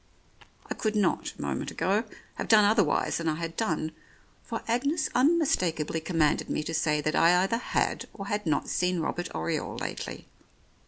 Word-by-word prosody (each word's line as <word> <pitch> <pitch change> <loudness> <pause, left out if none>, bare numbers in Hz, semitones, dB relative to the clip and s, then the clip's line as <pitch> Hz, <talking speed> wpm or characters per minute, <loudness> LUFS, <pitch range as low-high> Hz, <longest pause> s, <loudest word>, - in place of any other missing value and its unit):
I - - -2
could 215 -1 -2
not, 205 -2 +1
a - - -8
moment - - -2
ago, 205 +5 0 0.3
have - - -5
done 215 -2 +7
otherwise 205 -6 +2
than 165 - -3
I 155 - 0
had 165 0 -5
done, 160 -7 -1 0.5
for - - -5
Agnes 280 +7 0
unmistakably 245 - +2
commanded 160 -3 +1
me 155 - -1
to 165 - -4
say 150 -2 +1
that 155 +1 -1
I 175 +2 +5
either 210 +4 +1
had - - -1
or 195 - -8
had 205 -2 -2
not 150 -2 +1
seen 180 -1 0
Robert 175 +2 -2
Oriole 80 0 -2
lately. - - -5
180 Hz, 170 wpm, -28 LUFS, 160-220 Hz, 0.5 s, done